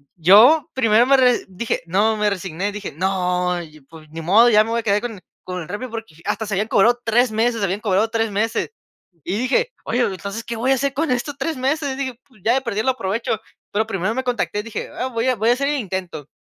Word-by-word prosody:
yo 215 - +6
primero 230 -2 +4
me 275 +1 +5
re 250 -2 +3
dije: 190 +2 -3
"No", 210 +5 +2
me 210 0 +2
resigné 190 0 -3
y - - -5
dije: 205 -1 -6
"No 180 0 0
y 155 -2 -12
y - - -19
pues 155 +3 -16
ni 165 +2 -7
modo, 210 +9 +5
ya 215 -2 +5
me 225 - -5
voy 235 - +1
a - - -21
quedar 205 -1 +1
con 230 -3 -5
e - - -15 0.2
con 180 -1 -5
el 160 - -8
Rappi 205 +6 -4
porque", 225 -8 -8
hasta 220 - -2
se 200 - -2
habían 210 +3 0
cobrado 240 +5 +4
3 235 +1 +3
meses, 225 +1 0
habían 195 +1 -1
cobrado 210 +1 +1
3 225 -1 -1
meses. 225 +3 -1 0.5
Y 185 - -2
dije: 275 - +1
"Oye, 245 - -1
pero 205 - +1
entonces, 200 +5 -6
¿qué 235 - -5
voy 250 +4 +1
a - - +5
hacer 275 +1 -1
con 305 +3 -1
esto 250 +4 -1
3 325 -3 -2
meses?". 275 +1 -1
Dije: 260 -3 -4
"Pues 245 -7 -24
ya 230 - +4
de 265 - +1
perder 220 -4 -2
lo 260 - +4
aprovecho". 225 -1 -2 0.3
Pero 215 +2 0
primero 195 0 -1
me 260 - -1
contacté, 240 -4 -1
dije: 230 -1 -6
"Ah, 255 - -1
voy 230 -1 -2
a 255 - +2
voy 220 +1 +1
a - - +6
hacer 275 +3 -1
el 295 - 0
intento". 185 - -5
220 Hz, 255 wpm, -21 LUFS, 195-245 Hz, 0.5 s, yo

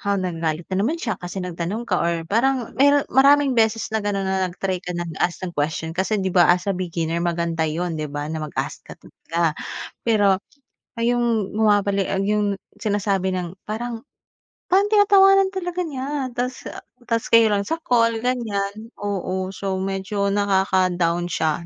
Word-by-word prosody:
ha, 200 -1 0
nagagalit 165 -3 -2
na 185 - +1
naman 275 +11 +1
siya 225 - -3
kasi 180 +1 -5
nagtanong 180 +6 -4
ka 185 -6 0
or 170 -1 0
parang 240 +5 0
mero 285 0 +5
maraming 280 +1 +5
beses 225 -2 +1
na 220 - +1
gano'n 205 -1 -1
na 190 -1 0
nag-try 185 0 -3
ka 180 -1 -5
nag-ask 175 +2 -2
ng 175 - -5
question 160 +1 -2
kasi 190 +5 0
'di 190 -2 -1
ba 175 -2 +5
as 180 +1 +3
a 200 - 0
beginner 170 -2 -2
maganda 170 -2 0
'yon 170 +3 -2
'di 155 -2 -3
ba 145 +1 -4
na 160 - -3
mag-ask - - -4
ka - - -12
talaga. 165 -1 -2 0.5
Pero, 205 -4 +4 0.6
ah, 230 - -6
'yong 230 -4 +1
bumabali 205 -2 +2
ah, 195 +1 -1
'yong 205 0 +1 0.2
sinasabi 200 -3 0
ng 180 0 -4
parang 230 +3 -5 0.6
parang 390 +3 +4
tinatawanan 390 -2 +5
talaga 360 -2 -3
niya 280 -3 -3
ta's 250 +1 -2
ah, - - -9 0.3
ta's 230 0 0
kayo 230 -1 +5
lang 200 -1 0
sa 325 +6 -3
call 230 -4 +2
ganiyan. 220 -3 -2
Oo, 190 -2 -2
so 195 0 -4
medyo 195 +1 -1
nakaka-down 185 -4 +1
siya 160 -1 -1
200 Hz, 170 wpm, -22 LUFS, 175-230 Hz, 0.6 s, mero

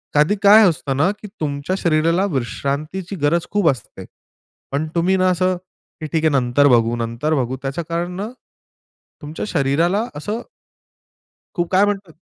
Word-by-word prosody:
कधी 150 +8 +4
काय 210 +2 +8
असतं 135 -4 -3
ना, 155 +6 +3
की 215 - -9
तुमच्या 145 +4 -2
शरीराला 165 +3 +2
विश्रांतीची 150 +8 -3
गरज 160 +4 +1
खूप 205 -5 +3
असते. 130 - -5 0.7
पण 145 +3 -1
तुम्ही 175 +3 +2
ना 185 0 +3
असं 185 +1 +1 0.5
की - - -3
ठीक 160 -1 +1
आहे - - +5
नंतर 135 +2 +3
बघू, 120 -2 +3
नंतर 115 +6 -2
बघू. 130 -1 -1
त्याच्या 135 +5 -3
कारण 170 +1 -2
ना 205 +3 -4 0.9
तुमच्या 150 +2 -5
शरीराला 165 +7 +1
असं 210 +10 -4 1.1
खु 175 - +1
काय 190 +2 +5
म्हणते? 195 -5 -4
160 Hz, 150 wpm, -20 LUFS, 140-185 Hz, 1.1 s, काय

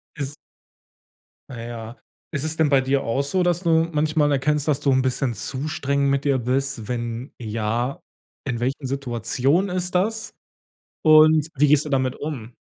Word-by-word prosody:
Ist 140 -1 -4 1.2
Na 120 -3 -7
ja. 115 0 -8 0.3
Ist 140 -1 -2
es 155 0 -2
denn 160 -2 +3
bei 140 -2 +4
dir 135 +1 0
auch 135 +5 0
so, 180 +7 0
dass 175 0 +1
du 170 - +1 0.2
manchmal 150 -1 +2
erkennst, 150 +2 0
dass 145 -1 +1
du 140 - +2
'n 130 0 +3
bisschen 130 -1 0
zu 135 +6 -4
streng 140 -1 0
mit 140 +1 0
dir 140 -2 +2
bist? 130 -2 -1
Wenn 120 +1 -4
ja, 115 +3 -2 0.4
In 125 -4 -2
welchen 135 +3 -2
Situationen 135 - 0
ist 180 0 -2
das? 220 +5 0 0.7
Und 155 0 +6
wie 145 +1 +4
gehst 150 0 +4
du - - -5
damit 130 -1 0
um? 125 -6 -6
140 Hz, 170 wpm, -23 LUFS, 125-150 Hz, 1.2 s, Und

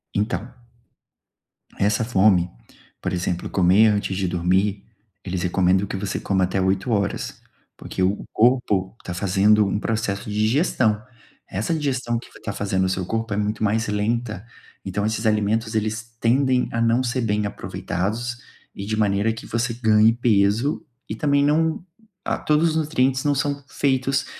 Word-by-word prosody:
Então, 110 +3 -1 1.3
essa 105 +2 +2
fome 95 -5 +3 0.5
por - - -2
exemplo, 90 -1 -2
comer 95 +4 +5
antes 100 -2 0
de 95 -1 -1
dormir, 95 +3 0 0.4
eles 90 -1 -3
recomendam 95 +2 +2
que 95 - -5
você 100 0 -3
coma 95 -2 +1
até 95 +1 -1
20:00, 95 +2 -1 0.3
porque - - -6
o 95 +2 +1
corpo 110 -5 +2
tá 90 - -5
fazendo 100 +3 +3
um 100 - -1
processo 105 -2 -2
de 105 - -4
digestão, 110 - +2 0.5
essa 110 - -2
digestão 130 -6 -1
que 115 - -9
f - - -16
tá 100 - -4
fazendo 95 -2 0
o - - 0
seu 95 -1 -2
corpo 115 +2 -2
é - - -2
muito 105 +1 -1
mais 110 +1 +1
lenta, 110 0 -2 0.4
então 100 +2 -2
esses 110 +1 -2
alimentos 110 +1 +1
eles 110 +1 -2
tendem 130 +2 +2
a 115 - -2
não 115 +2 +2
ser 125 +1 -1
bem 105 -2 0
aproveitados, 110 +5 -3 0.4
e 100 - -7
de 110 +1 -2
maneira 105 +1 +1
que 115 - -9
você 115 0 -1
ganhe 110 -1 +4
peso, 115 +3 +2 0.3
e - - -2
também 140 +4 +2
não 160 +4 +1 0.4
a - - 0
todos 155 +2 +2
os - - -3
nutrientes 135 -4 +1
não 145 -1 +2
são 140 0 -2
feitos, 135 0 0
110 Hz, 160 wpm, -23 LUFS, 100-120 Hz, 1.3 s, comer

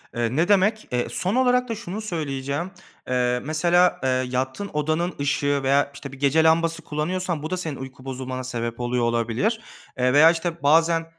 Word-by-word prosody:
Eee, 120 +1 -1
ne 165 +4 +2
demek. 210 +2 +2
Eee, 125 -1 0
son 190 +6 -1
olarak 250 -1 +2
da 230 - -2
şunu 215 -1 -6
söyleyeceğim, 150 -3 -3 0.4
eee, 125 -1 0
mesela, 175 +4 +2
eee, 130 - +2
yattığın 130 +8 -2
odanın 155 +4 -1
ışığı 145 0 +1
veya, 140 +1 +2
işte, 140 -1 -9
bir 135 - -12
gece 145 +3 +3
lambası 165 0 +2
kullanıyorsan, 165 +2 -3
bu 155 - -4
da 185 - -2
senin 160 -5 -3
uyku 130 -1 -10
bozulmana 130 -1 -5
sebep 120 -2 -4
oluyor 120 0 -1
olabilir. 120 - 0 0.4
Eee, 125 0 +2
veya, 155 +3 +7
işte, 170 -1 -4
bazen, 165 +3 +3
150 Hz, 175 wpm, -23 LUFS, 130-175 Hz, 0.4 s, veya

